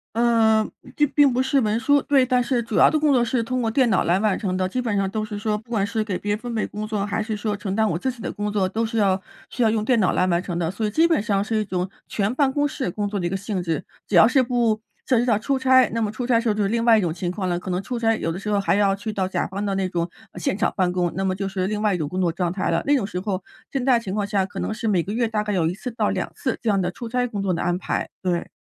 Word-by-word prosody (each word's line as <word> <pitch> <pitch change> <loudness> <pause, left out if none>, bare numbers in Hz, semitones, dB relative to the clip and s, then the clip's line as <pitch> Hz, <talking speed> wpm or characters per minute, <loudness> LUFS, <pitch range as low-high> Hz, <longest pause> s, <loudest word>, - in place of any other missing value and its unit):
嗯， 225 -2 +3 0.2
并 295 -1 +2
并 285 -3 +5
不 250 +1 +2
是 265 +2 +1
文 220 -1 0
书。 285 +3 +4
对， 275 -3 +3
但 250 -1 +2
是 240 -1 0
主 225 -2 -4
要 - - +6
的 310 - +1
工 300 -1 +3
作 245 -2 +3
是 240 0 0
通 255 +2 -2
过 225 - 0
电 255 +2 +3
脑 195 - +2
来 175 +2 +2
完 210 -1 +1
成 190 -3 -2
的。 185 0 0
基 250 +7 -2
本 230 -4 -1
上 195 -1 0
都 215 +1 -2
是 210 -1 -5
说 210 0 -1
不 225 +3 -13
管 205 -4 +1
是 220 +1 -1
给 195 -4 -3
别 205 - -2
人 - - -4
分 240 +1 -6
配 220 - 0
工 210 +1 -5
作， 210 -2 -2
还 205 +2 -1
是 215 0 -3
说 210 0 -2
承 195 -1 -4
担 220 +1 +2
我 165 - -1
自 260 +8 -1
己 245 - -15
的 - - -4
工 210 0 -3
作， 195 -3 +1
都 220 +4 -1
是 225 0 -2
要 195 -2 +2 0.3
需 245 - -3
要 225 - +4
用 215 -1 0
电 235 +2 +2
脑 190 - +2
来 185 - +2
完 175 -1 +1
成 175 -3 -4
的， 165 -1 -1
所 215 +4 -2
以 - - -1
基 320 +10 +4
本 325 -11 +2
上 200 -3 +1
是 220 +2 -2
一 - - -1
种 185 -2 -2 0.2
全 210 +3 -1
办 270 -1 +2
公 290 +1 +1
室 275 -9 -3
工 205 +3 -2
作 200 0 -3
的 180 - -3
一 - - -1
个 - - -3
性 200 -2 -3
质。 165 -3 -2 0.2
只 - - -5
要 180 +5 +8
是 265 +1 +4
不 235 -3 +1 0.3
涉 255 - +3
及 235 - +2
到 230 -4 +2
出 270 +5 -1
差， 260 -1 +5
那 230 - 0
么 210 -1 -1
出 240 +3 -4
差 250 - +2
的 230 - +4
时 - - -8
候 - - +1
就 210 - 0
是 200 - +1
另 230 +2 0
外 230 -2 +6
一 - - +3
种 175 -5 -1
情 175 0 -3
况 185 -1 -3
了， 175 -1 0
可 180 - -6
能 180 +1 -1
出 245 +4 -4
差 225 -1 +2
有 165 - -2
的 165 - -4
时 210 +2 -4
候 205 -1 +2
还 200 - +1
要 200 -1 +3
去 210 +2 -5
到 190 -2 0
甲 190 - -1
方 195 +2 -4
的 200 -1 -1
那 190 -1 0
种， 170 -2 -1 0.3
呃， - - -9
现 175 - 0
场 225 - +2
办 180 -2 +1
公， 180 -1 0
那 195 - -1
么 190 -1 +1
就 195 +1 -3
是 190 -1 -2
另 210 +1 -2
外 210 -2 +2
一 - - +1
种 155 -4 -2
工 185 +5 -3
作 175 -2 +2
状 170 +1 -1
态 185 -2 -2
了。 165 0 +1
那 290 - +4
种 245 -8 +1
时 180 - -5
候 190 -1 -3 0.3
现 270 - -2
在 250 -2 +4
情 205 -5 -5
况 205 -1 -1
下 200 -2 +1
可 190 - -6
能 220 - -2
是 225 - -4
每 190 -5 +2
个 200 +5 -5
月 235 0 +1
大 220 -1 -1
概 210 -1 -2
有 170 -4 +1
1 165 - +1
次 250 +6 -6
到 225 -3 0
2 - - -2
次 260 - -2
这 230 - -3
样 200 -2 +3
的 175 - -1
出 230 +6 -7
差 250 +1 0
工 210 -4 -4
作 190 -2 0
的 - - -2
安 175 0 0
排， - - -3
对。 180 -2 -1
210 Hz, 365 characters per minute, -23 LUFS, 190-235 Hz, 0.3 s, 要